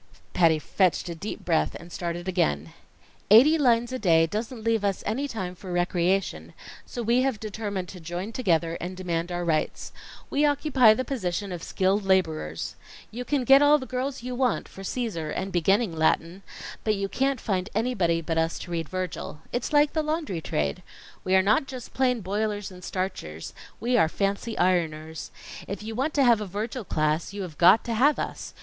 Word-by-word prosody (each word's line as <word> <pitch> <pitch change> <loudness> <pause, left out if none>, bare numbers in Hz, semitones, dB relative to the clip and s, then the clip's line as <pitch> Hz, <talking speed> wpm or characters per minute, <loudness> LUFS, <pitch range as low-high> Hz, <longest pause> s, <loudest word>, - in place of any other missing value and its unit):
Patty 165 -3 +4
fetched 180 +2 +1
a - - -3
deep 170 +6 -7
breath 165 -3 +1
and 170 +1 -10
started 175 +1 -4
again. 80 - 0 0.6
"Eighty 255 +10 +8
lines 240 -3 +3
a 255 - -3
day 165 -5 +4
doesn't 220 +6 -4
leave 225 -2 +1
us 200 -2 -1
any 260 +7 -1
time 190 -8 -4
for 185 +1 -9
recreation, 175 +2 0 0.3
so 240 - -5
we 235 +3 +3
have 260 -5 0
determined 205 -3 -4
to 185 - -9
join 175 +5 -5
together 170 -8 0
and 180 +1 -5
demand 175 -1 -2
our 175 0 -2
rights. 160 -2 -1 0.4
We 285 - +2
occupy 275 -6 +4
the 255 - -2
position 200 -6 -3
of 175 -2 -5
skilled 195 +4 0
laborers. 160 - 0 0.4
You 240 +3 -5
can 275 0 0
get 270 +3 +7
all 290 +1 +6
the 260 - -6
girls 255 0 -3
you 250 0 -4
want 250 -2 0
for 195 - -12
Cæsar 195 -7 -3
and 195 +1 -3
beginning 195 +2 +2
Latin, 165 +3 +1 0.4
but 215 -1 +2
you 195 0 -2
can't 270 +4 0
find 190 -2 -2
anybody 195 -8 +1
but 165 0 -1
us 165 +1 0
to 175 - -8
read 165 -2 -3
Virgil. 185 -4 -5
It's 245 - -2
like 295 0 +4
the 315 - +1
laundry 305 - -2
trade. 75 - -2 0.4
We 185 - +2
are 190 - +5
not 215 +7 +3
just 255 -3 -8
plain 250 -3 +1
boilers 205 +1 -2
and 180 -1 -12
starchers; 180 - -4 0.3
we 245 +3 +1
are 160 -8 +4
fancy 200 +5 -2
ironers. 160 -3 0 0.4
If 200 +1 -5
you 220 +1 -5
want 270 +7 -1
to 280 - +4
have 235 -4 +5
a 210 - -4
Virgil 220 +6 -4
class, 155 +3 0
you 200 -1 -4
have 165 -4 -9
got 185 +5 +7
to 235 - -3
have 275 +6 +4
us. - - -5
195 Hz, 190 wpm, -26 LUFS, 175-240 Hz, 0.6 s, Eighty